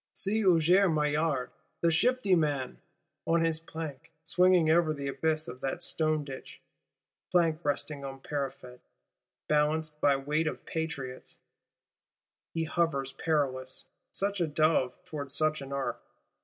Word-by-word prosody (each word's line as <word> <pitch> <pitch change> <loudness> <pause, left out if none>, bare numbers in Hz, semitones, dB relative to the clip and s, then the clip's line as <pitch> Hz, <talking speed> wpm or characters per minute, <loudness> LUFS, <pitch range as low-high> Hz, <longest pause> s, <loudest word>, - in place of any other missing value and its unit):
See 215 +3 0
Huissier 180 +1 +5
Maillard, 150 -3 0 0.3
the 170 - +3
shifty 240 +3 +3
man! 145 -6 0 0.5
On 165 0 +3
his 160 -1 +1
plank, 160 -4 -7
swinging 180 -3 +4
over 160 -2 +3
the 140 -1 -4
abyss 155 +2 0
of 125 +1 -8
that 135 +6 -2
stone 155 -2 0
Ditch; 135 -2 -9 0.7
plank 170 -2 +2
resting 145 0 -2
on 135 -1 -6
parapet, 135 -3 -5 0.7
balanced 150 0 +1
by 140 -1 +5
weight 150 +4 0
of - - -4
Patriots,—he 160 +2 -8
hovers 155 -5 0
perilous: 130 -5 -1 0.3
such 200 -1 0
a 170 - +2
Dove 155 -4 +2
towards 140 -3 -5
such 155 -1 +2
an 135 0 -8
Ark! 140 -1 -2
155 Hz, 130 wpm, -30 LUFS, 140-165 Hz, 0.7 s, Huissier